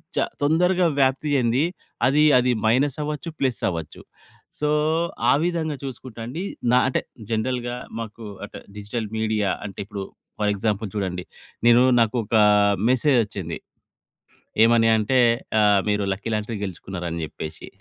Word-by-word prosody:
చా - - +2 0.2
తొందరగా 175 +5 +3
వ్యాప్తి 135 +2 +2
చెంది, 125 +2 +2 0.4
అది, 145 +3 +4
అది 125 0 +3
మైనస్ 130 +5 +2
అవ్వచ్చు, 150 +3 -4
ప్లస్ 130 -6 0
అవ్వచ్చు. 80 -4 -6 0.6
సో, 150 - 0 0.6
ఆ - - +6
విధంగా 165 -3 -1
చూసుకుంటే 130 -3 -8
అండి, 150 +10 -5 0.3
నా 125 - +5
అంటే, 130 - 0 0.3
జనరల్‌గా 120 +2 -1 0.2
మాకు 115 0 -7 0.2
అంటే, - - -10 0.2
డిజిటల్ 105 +2 -4
మీడియా 110 -2 0 0.2
అంటే, 100 - -8
ఇప్పుడు 100 -1 -6 0.4
ఫర్ 105 -1 +2
ఎగ్జాంపుల్ 105 +1 -1
చూడండి. 90 -3 -2 0.4
నేను 120 +1 +7 0.2
నాకు 115 0 +2
ఒక 110 - -2 0.5
మెసేజొచ్చింది. 115 - +1 1.1
ఏమని 115 -1 +4
అంటే, 110 +4 +2 0.4
ఆహ్, 105 -1 +4
"మీరు 105 0 +1
లక్కీ 105 +4 -5
లాంటరీ 110 +1 -3
గెలుచుకున్నారు" 95 -1 -6
అని 85 0 -3
చెప్పేసి. 80 0 -8
115 Hz, 135 wpm, -23 LUFS, 105-130 Hz, 1.1 s, నేను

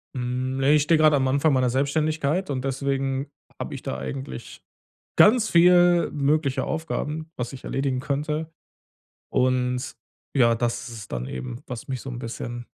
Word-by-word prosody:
Hm, - - -3 0.4
ne, 135 +2 +4
ich 150 - +4
stehe 160 +2 +4
gerade 155 -1 +5
am 130 -1 +1
Anfang 140 +3 +3
meiner 130 -2 +3
Selbstständigkeit, 150 +5 0
und 130 -2 -2
deswegen 135 0 -1 0.3
habe - - -5
ich - - -6
da 65 - -4
eigentlich 65 -1 -7 0.5
ganz 220 0 +5
viel 175 0 +5
mögliche 140 -2 +1
Aufgaben, 160 0 -3
was 125 +1 -4
ich 135 - -10
erledigen 135 -1 -1
könnte. 150 +3 -2 0.8
Und 125 0 0 0.4
ja, 115 -3 +5
das 120 +1 -2
ist 115 - -8
es 105 - -9
dann 60 0 -4
eben, 65 -2 -6
was 125 +4 -7
mich 130 -3 -4
so 135 - -7
'n 120 -1 -6
bisschen 120 0 -6
135 Hz, 165 wpm, -24 LUFS, 125-155 Hz, 0.8 s, gerade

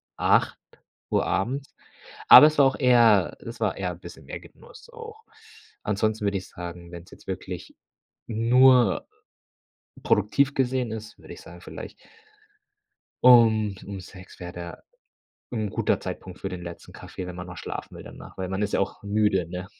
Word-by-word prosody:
08:00 - - -1
abends. 130 +9 -2 0.5
Aber 150 - +11
es 155 -1 0
war 140 - +7
auch 135 - +1
eher 115 -7 +4
es 115 0 -9
war 105 -4 0
eher 90 -2 -3
bisschen 85 - -13
mehr - - -7
Genuss 475 - -16
auch. 455 -2 -11 0.6
Ansonsten 105 +1 -1
würde 100 -1 0
ich 95 - -11
sagen, 85 0 -9
wenn's 85 0 -11
jetzt - - -17
wirklich - - -7 0.5
nur 120 -1 +4 1.0
produktiv 135 +7 +2
gesehen 130 -2 0
ist, 110 -1 -8
würde - - -11
ich - - -13
sagen 85 +1 -13
vielleicht - - -9 1.3
um 110 -4 +6
um 100 -1 -6
6 90 0 -14
wäre 90 0 -6
da 85 0 -9 0.7
'n 110 -3 -2
guter - - 0
Zeitpunkt 95 -1 -7
für 95 - -3
den 90 -2 -7
letzten 85 -1 -10
Kaffee, 90 - -8
wenn 90 - -8
man 90 0 -7
noch 90 -1 -9
schlafen - - -7
will - - -9
dann - - -12
nachher, - - -13
weil 95 -1 -3
man 95 +2 -3
ist 105 - -2
ja - - +1
auch 100 - -3
müde, 100 -3 +1
ne? 90 +1 -6
105 Hz, 165 wpm, -25 LUFS, 90-120 Hz, 1.3 s, Aber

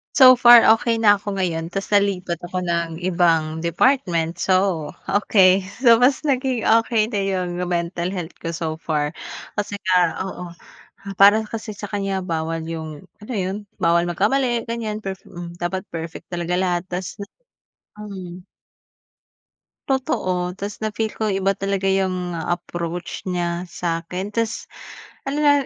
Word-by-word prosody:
So 255 -1 +9
far 240 -1 +8
okey 230 0 -1
na 210 -2 +6
ako 205 -1 -4
ngayon 165 -3 -2
ta's 195 +2 -3
nalipat 190 -4 +1
ako 175 +1 -4
ng 170 -1 -1
ibang 165 -3 +1
department, 170 - +1
so 185 -5 +1 0.2
okey. 195 -2 +4 0.2
So 235 -2 +5
mas 275 +4 +3
naging 260 -4 0
okey 225 -1 +3
na 215 -3 -2
'yung 185 -2 -1 0.2
mental 170 +1 -1
health 180 -3 -5
ko 165 - -3
so 165 -1 -3
far. 155 -1 -2 0.4
Kasi 205 -1 -3
nga 180 -2 +3
oo, 180 -2 -7 0.3
ah 195 0 -11
para 205 +2 +7
kasi 220 -1 -6
sa 205 -1 -8
kanya 195 -2 -2
bawal 165 -1 -2
'yung, 160 -2 -6 0.2
alam 220 +3 -7
mo - - -1
'yun, 190 +2 -2 0.3
bawal 170 0 +3
magkamali 235 +7 +1
ganiyan 220 -2 -4
perfe 195 -1 -6
hmm, 175 -1 -9
dapat 180 +2 -2
perfect 165 0 -7
talaga 175 0 -2
lahat 180 -1 0
ta's 180 0 -5
na 200 - -6 0.8
mhm. 185 -3 -9 1.4
Totoo, 185 - -1
ta's 200 +1 -5
na 215 - 0
feel 220 -1 -1
ko 220 - -2
iba 195 0 +1
talaga 195 0 -1
'yung 185 -2 0
approach 175 +1 -4
niya 175 -1 -2
sa'kin, 175 +2 -4
ta's 230 -1 -2 0.6
ano 280 +2 -2
na 295 -1 +5
185 Hz, 150 wpm, -22 LUFS, 170-210 Hz, 1.4 s, So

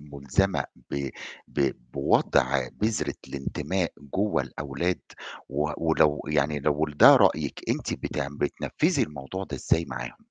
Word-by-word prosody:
مُلزمة 75 +7 0 0.3
ب 70 -1 -2 0.4
ب 70 -2 +1 0.2
بوضع 65 -1 +2
بذرة 110 -1 -1
الانتماء 85 +6 -2 0.2
جوّه 100 -9 +1
الأولاد، 70 +8 -3 0.5
و 75 +2 -1
ولو 80 -2 +3
يعني 75 0 +1
لو 75 +2 +1
ده - - +9
رأيِك - - +2
أنتِ - - -1
بتعم 70 -1 -3
بتنفِّذي 75 - 0
الموضوع 75 +6 -5
ده - - -6
إزاي 80 - +1
معاهم؟ 65 -2 -6
75 Hz, 120 wpm, -27 LUFS, 70-85 Hz, 0.5 s, ده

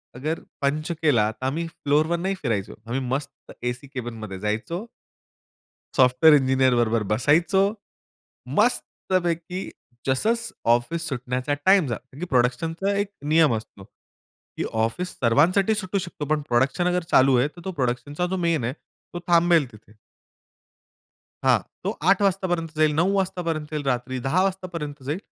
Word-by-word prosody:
अगर 155 +6 -2 0.2
पंच 155 +4 0
केला 115 -9 +3
तर 130 - -8
आम्ही 165 +5 -1
फ्लोअरवर 160 0 0
नाही 190 +2 -1
फिरायचो. 110 -7 -2
आम्ही 125 +4 -2
मस्त 135 +3 -5
एसी 125 +3 -3
कॅबिनमध्ये 110 -6 -6
जायचो 110 - -3 1.1
सॉफ्टवेअर 130 +5 +6
इंजिनिअर 130 -2 +3
बरोबर 115 -2 +2
बसायचो. 165 - +3 1.0
मस्तपैकी 180 0 0 0.4
जस 130 +10 +1 0.5
ऑफिस 165 +7 -3
सुटण्याचा 125 +2 -2
टाईम 190 -6 +5
झाला. 130 +7 -6
प्रोडक्शनचा 165 +10 +1
एक 205 0 0 0.3
नियम 160 -6 +5
असतो, 105 -3 -8 0.7
की - - -1 0.2
ऑफिस 180 +11 -3
सर्वांसाठी 180 - +3
सुटू 200 -1 -2
शकतो 175 -4 -6
पण 150 - 0
प्रोडक्शन 140 +9 +2
चालू 130 0 +5
आहे 130 +4 +3
तर 175 +3 -13
तो 190 - -2
प्रोडक्शनचा 145 +4 -2
जो 190 +1 -2
मेन 160 -7 +1
आहे 125 +3 -1 0.4
तो 175 - -4
थांबेल 170 -3 +4
तिथे. 110 0 -17 1.5
हां, - - +4 0.2
तो - - 0 0.2
8 195 +1 +4
वाजतापर्यंत 175 -4 0
जाईल 155 -1 +4
9 175 +5 +2
वाजतापर्यंत 170 -5 -1
येईल 150 -1 -2
रात्री 130 0 -1
10 180 +7 +3
वाजतापर्यंत 170 -7 -4
जाईल, 150 +7 -3
150 Hz, 135 wpm, -24 LUFS, 125-175 Hz, 1.5 s, सॉफ्टवेअर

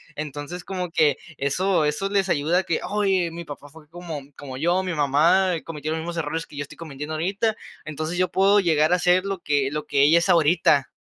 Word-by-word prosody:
Entonces, 150 +4 -6
como 180 -3 -4
que 150 -4 +3 0.2
eso 175 +5 +1
eso 150 +7 -1
les 195 -1 +1
ayuda 165 +2 +2
a - - -1
que: 170 -3 -1
"Oye, 195 -4 +1
mi 170 +1 -7
papá 145 -1 -9
fue 155 +1 -16
como 165 -3 -7 0.2
como 135 -3 -8
yo, 175 +6 +1
mi 180 -1 -3
mamá 165 +6 +3
cometió 155 -1 -5
los 160 - -2
mismos 170 +1 -5
errores 165 +1 -3
que - - -14
yo - - -3
estoy 140 - -13
cometiendo 155 -1 -6
ahorita, 195 +7 -1 0.3
entonces, 155 +3 -4
yo 185 0 +1
puedo 195 +2 +4
llegar 160 -2 +2
a 180 - +2
ser 180 +2 +3
lo 195 -2 -3
que 140 -2 0
lo 150 0 -4
que 140 -1 +2
ella 160 +4 +6
es 170 - -2
ahorita". 155 -4 +3
165 Hz, 220 wpm, -23 LUFS, 150-180 Hz, 0.3 s, ella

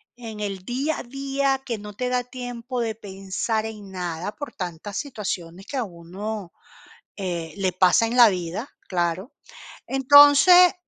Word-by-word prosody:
en 225 -3 -8
el 195 -2 -3
día 275 +6 -1
a - - -6
día, 275 +1 -1
que 235 -4 -3
no 210 0 -9
te 250 +5 -2
da 250 0 +1
tiempo 245 -1 -5
de 225 -1 -1
pensar 200 +2 -3
en 210 -3 -8
nada, 180 +1 -4
por 290 -2 -7
tantas 180 +2 -6
situaciones 190 - -5
que 275 - -5
a 255 - +1
uno, 190 +2 -7 0.7
eh, 175 -4 -4
le 190 -2 +1
pasa 185 +5 +4
en 240 - -2
la 240 -2 +9
vida, 185 +6 -3 0.2
claro. 180 - -1 0.6
Entonces 290 +7 +7
215 Hz, 155 wpm, -24 LUFS, 185-255 Hz, 0.7 s, la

